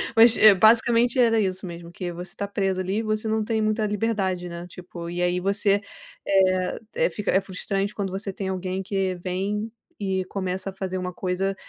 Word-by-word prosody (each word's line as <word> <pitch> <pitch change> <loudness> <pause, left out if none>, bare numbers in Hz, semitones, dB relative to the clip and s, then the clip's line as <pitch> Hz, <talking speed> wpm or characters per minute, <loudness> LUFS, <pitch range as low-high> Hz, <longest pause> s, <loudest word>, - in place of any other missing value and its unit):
Mas 230 +1 +7
é 215 -1 +9
basicamente 230 +4 +4
era 230 -2 +4
isso 190 -2 -1
mesmo 170 -1 -8
que 175 0 -5
você 175 +1 -9
tá 200 - -3
preso 195 -2 -1
ali 190 +2 -2
e - - -2
você 215 0 -1
não 220 0 +1
tem 220 0 0
muita 215 0 +1
liberdade, 200 -4 -1
né, 170 +1 -7
tipo, 175 -1 -9
e 175 +1 -3
aí 180 0 +1
você, 200 +1 +1 0.4
eh 185 -1 +2 0.2
eh, - - +2
fica 210 -1 -2
é 190 - +4
frustrante 195 +1 -3
quando 195 -2 -2
você 195 +1 -4
tem 190 0 -4
alguém 185 0 -3
que 190 -1 -1
vem 195 +5 -3 0.3
e 190 -2 -1
começa 185 0 -3
a - - -18
fazer 190 -1 -4
uma 180 0 -4
coisa 190 +2 -1
195 Hz, 200 wpm, -25 LUFS, 185-210 Hz, 0.4 s, é